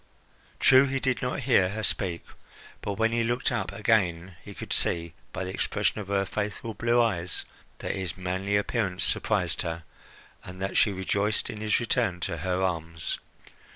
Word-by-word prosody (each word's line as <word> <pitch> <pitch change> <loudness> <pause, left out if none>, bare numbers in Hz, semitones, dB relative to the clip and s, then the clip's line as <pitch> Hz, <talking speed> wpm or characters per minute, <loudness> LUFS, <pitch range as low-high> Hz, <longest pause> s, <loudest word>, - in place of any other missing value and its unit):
True, 130 +1 +7
he 135 0 -1
did 130 -2 0
not 125 +2 -1
hear 120 -8 +4
her 110 +2 -4
speak; 90 -3 -1 0.6
but 100 - -2
when 115 +3 +2
he 115 0 +2
looked 120 +4 0
up 120 - -1
again 95 -5 +1
he - - -10
could - - -4
see, 85 -1 0 0.2
by - - -3
the 95 - -4
expression 105 - 0
of 100 - -8
her 100 0 +1
faithful 105 +2 -3
blue 120 +2 +2
eyes, 95 -7 0 0.3
that - - -3
his 95 -2 -3
manly 95 +2 -1
appearance 100 -3 0
surprised - - +1
her, 85 0 -3 0.6
and 90 0 -9
that 95 0 -2
she 110 - +5
rejoiced 100 +2 +1
in 105 - -7
his 110 -1 +2
return 115 -6 +1
to 85 - -2
her 90 +4 0
arms. 85 -3 -2
100 Hz, 175 wpm, -28 LUFS, 90-115 Hz, 0.6 s, True